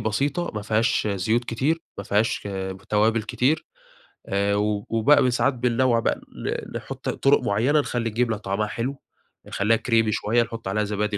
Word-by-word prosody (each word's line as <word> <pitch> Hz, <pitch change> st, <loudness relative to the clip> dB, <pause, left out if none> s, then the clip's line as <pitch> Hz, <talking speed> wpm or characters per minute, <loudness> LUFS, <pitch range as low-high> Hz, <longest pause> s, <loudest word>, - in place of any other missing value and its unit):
بسيطة، 140 Hz, -, -1 dB
ما 105 Hz, -, -3 dB
فيهاش 110 Hz, +1 st, +1 dB
زيوت 110 Hz, +5 st, 0 dB
كتير، 135 Hz, +8 st, 0 dB, 0.2 s
ما 100 Hz, -, -5 dB
فيهاش 105 Hz, 0 st, 0 dB, 0.4 s
توابل 110 Hz, +2 st, +2 dB
كتير. 130 Hz, +8 st, 0 dB, 0.6 s
آآ 100 Hz, +1 st, +1 dB
و 105 Hz, 0 st, 0 dB
وبقى 115 Hz, +7 st, +4 dB
ب 125 Hz, -, +3 dB
ساعات 130 Hz, +3 st, +2 dB
بننوّع 120 Hz, 0 st, +2 dB
بقى -, -, -1 dB
ن -, -, -4 dB
نحُط -, -, -6 dB
طُرق -, -, +3 dB
معينة، 120 Hz, +9 st, +2 dB
نخلّي 120 Hz, -4 st, -1 dB
الجبنة 115 Hz, -1 st, 0 dB
طعمها 105 Hz, +1 st, -2 dB
حلو، 130 Hz, +6 st, -4 dB, 0.4 s
نخلّيها 110 Hz, +3 st, +1 dB
كريمي 115 Hz, -1 st, +2 dB
شوية، 115 Hz, +4 st, +2 dB
نحُط 115 Hz, -3 st, -7 dB
عليها 105 Hz, +2 st, 0 dB
زبادي، 105 Hz, 0 st, -1 dB
115 Hz, 160 wpm, -24 LUFS, 105-125 Hz, 0.6 s, وبقى